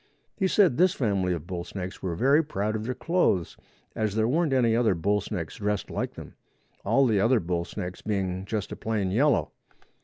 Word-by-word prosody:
He 190 - +1
said 185 - +3
this 180 +2 +4
family 100 -7 0
of 85 -3 -3
bull 90 -1 -4
snakes 90 +1 -7
were 90 -3 -2
very 140 - +4
proud 110 -7 -2
of 110 0 -3
their 130 +1 -2
clothes, 165 - +1 0.4
as 110 -2 -1
there 110 0 +2
weren't 155 +4 +1
any 120 -4 +3
other 115 -5 +3
bull 100 +5 +1
snakes 90 -6 -5
dressed 105 -1 -2
like - - -3
them, - - -10 0.5
all 135 0 +3
the 110 -5 +2
other 115 +4 +4
bull 85 -1 -2
snakes 90 -2 -6
being 95 -3 -2
just 105 -1 -3
a - - -4
plain 105 -4 -2
yellow. 135 +6 +2
105 Hz, 195 wpm, -27 LUFS, 95-130 Hz, 0.5 s, this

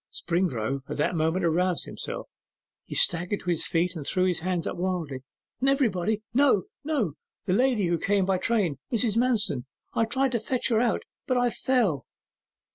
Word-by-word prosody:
Springrove 140 - -1
at - - -4
that 150 - +1
moment 165 +2 +1
aroused 175 +2 +1
himself; - - -5 0.6
he - - -7
staggered 180 +2 +2
to 180 - -1
his 165 - 0
feet, 170 +1 0
and 155 - -5
threw 185 +6 +1
his 180 -3 +1
hands 175 -1 -1
up - - -3
wildly. 175 -7 -2 0.4
'Everybody, 220 -7 +1
no! 260 -6 +4 0.2
no! 275 - 0 0.3
The 185 - +1
lady 245 -2 +3
who 170 -1 +1
came 200 +1 +2
by 190 -1 +1
train, 195 - +1
Mrs. 230 -2 +2
Manston! 225 - +2 0.3
I 225 - +2
tried 265 +3 +1
to 235 - 0
fetch 245 +4 -1
her 225 -1 +3
out, 240 -2 +1 0.2
but 255 - +2
I 245 -1 +2
fell. 220 - +1
185 Hz, 175 wpm, -27 LUFS, 170-235 Hz, 0.6 s, no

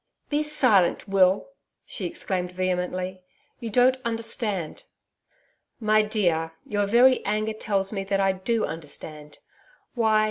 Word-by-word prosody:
'Be 295 0 +1
silent, 250 - +3
Will,' 195 - +3 0.4
she - - -4
exclaimed 180 -2 -3
vehemently. 185 0 -2 0.4
'You 235 -2 -5
don't 250 +3 +4
understand.' 225 -6 -3 0.9
'My 215 -1 +3
dear, 175 -7 0
your 205 -1 -1
very 250 +4 +5
anger 215 +1 -1
tells 200 -2 -1
me 195 -2 -2
that 195 0 0
I 195 0 +3
do 215 +4 -1
understand. 150 -1 -6 0.6
Why! 220 -3 +3
200 Hz, 120 wpm, -25 LUFS, 185-225 Hz, 0.9 s, very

